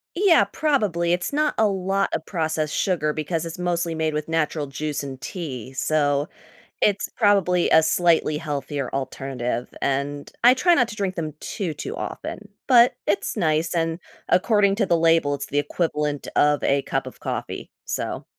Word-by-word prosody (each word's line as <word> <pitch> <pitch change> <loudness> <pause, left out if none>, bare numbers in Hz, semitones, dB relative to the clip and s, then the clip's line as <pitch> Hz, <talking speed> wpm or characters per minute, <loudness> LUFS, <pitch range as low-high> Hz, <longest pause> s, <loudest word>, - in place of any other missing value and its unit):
Yeah, 370 -2 +5
probably. 200 - 0
It's 175 +6 -1
not 300 +1 +1
a 220 -1 +4
lot 195 +1 0
of 160 - -2
processed 160 -4 -2
sugar 155 -5 0
because 160 +2 -2
it's 165 +2 -6
mostly 170 -2 -1
made 160 -1 -1
with 150 +1 -3
natural 155 -2 -1
juice 145 +1 -4
and 135 -2 -7
tea, 135 - -6
so 145 +1 +1 0.5
it's 205 -1 +2
probably 195 -5 +3
a 160 - +6
slightly 160 -2 +2
healthier 145 -3 -3
alternative, 130 -2 -3
and 140 +1 -2
I 245 - +8
try 345 +6 +4
not 245 -7 +3
to 210 - -8
drink 195 -2 -2
them 155 -3 -4
too, 180 -8 -4
too 425 +5 -6
often. - - -6 0.2
But 245 -1 +6
it's 200 +2 0
nice, 160 -2 +1
and 165 0 0 0.3
according 200 +1 +3
to 205 -3 +1
the 170 - +3
label, 165 -3 +3
it's 140 0 -5
the 145 - -1
equivalent 150 -2 -1
of 150 -1 +3
a 140 0 +2
cup - - -2
of - - -15
coffee, - - -5
so - - -4
165 Hz, 170 wpm, -23 LUFS, 145-195 Hz, 0.5 s, I